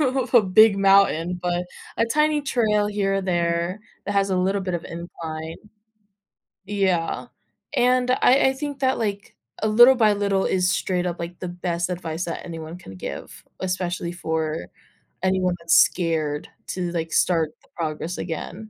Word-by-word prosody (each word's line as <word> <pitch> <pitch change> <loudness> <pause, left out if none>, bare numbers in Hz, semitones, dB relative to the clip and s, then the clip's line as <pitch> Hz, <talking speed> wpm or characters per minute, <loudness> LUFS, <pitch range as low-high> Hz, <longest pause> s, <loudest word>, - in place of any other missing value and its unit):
of 260 -3 0
a 240 - +8
big 200 +2 +5
mountain, 195 -3 +3
but 175 0 -1 0.3
a - - +3
tiny 300 +4 +2
trail 215 -6 +1
here 205 -1 0
or 195 - +1
there 170 +1 -1 0.3
that 205 - -1
has 195 0 +1
a 185 - +1
little 190 +2 +1
bit 185 -2 -3
of 170 - -4
incline. 165 -1 -7 1.1
Yeah. 190 -4 0 0.5
And 250 0 +3
I 260 +1 +4
I - - -1
think 285 0 -5
that 260 -1 +1
like 205 -2 -3 0.3
a 215 - +1
little 240 +5 +7
by 220 -4 +4
little 200 -1 0
is 185 0 +1
straight 180 -3 -1
up 175 -1 -3
like 170 +1 -6
the 180 - -4
best 175 0 -2
advice 170 -2 -4
that 170 - -5
anyone 165 -1 -7
can 95 - -12
give, 90 - -8 0.2
especially 180 -2 -2
for 160 - -3 0.6
anyone 185 -1 +1
that's 170 0 +2
scared 155 -4 +2 0.2
to 180 -2 -3
like 165 -1 -3
start 165 -4 +2
the - - -26
progress 160 +1 -3
again. 190 +5 -6
185 Hz, 165 wpm, -23 LUFS, 170-210 Hz, 1.1 s, a